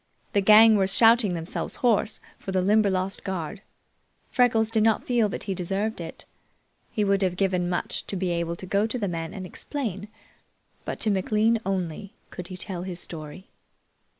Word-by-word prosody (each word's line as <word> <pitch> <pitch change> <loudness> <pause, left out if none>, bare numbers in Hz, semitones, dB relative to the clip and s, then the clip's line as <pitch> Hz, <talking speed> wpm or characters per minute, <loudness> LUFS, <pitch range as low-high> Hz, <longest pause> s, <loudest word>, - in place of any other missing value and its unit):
The 200 - +3
gang 215 +2 +7
were 190 -1 +2
shouting 225 -1 +4
themselves 165 +1 -3
hoarse 225 -3 +1 0.2
for 190 - -6
the 185 -1 +1
Limberlost 195 -2 +1
guard. 190 +1 -4 0.7
Freckles 225 -3 +3
did 220 -1 +2
not 220 0 +2
feel 235 -4 +2
that - - -5
he 195 - -2
deserved 195 +3 -2
it. 165 - -9 0.7
He 210 - 0
would 200 -1 +2
have 185 -2 +1
given 185 -2 +1
much 175 - -2
to - - -4
be 185 -1 -1
able 170 0 -1
to 185 - -9
go 200 +3 +1
to 225 - -2
the 210 -4 -2
men 165 -2 -4
and 190 -3 -7
explain, 210 -2 -5 0.8
but - - -4
to 215 - +2
McLean 215 +4 +2
only 190 +2 -3 0.2
could 180 -1 -7
he 185 - -8
tell 185 -1 -5
his 180 -1 -6
story. 160 +3 -8
195 Hz, 180 wpm, -25 LUFS, 180-215 Hz, 0.8 s, gang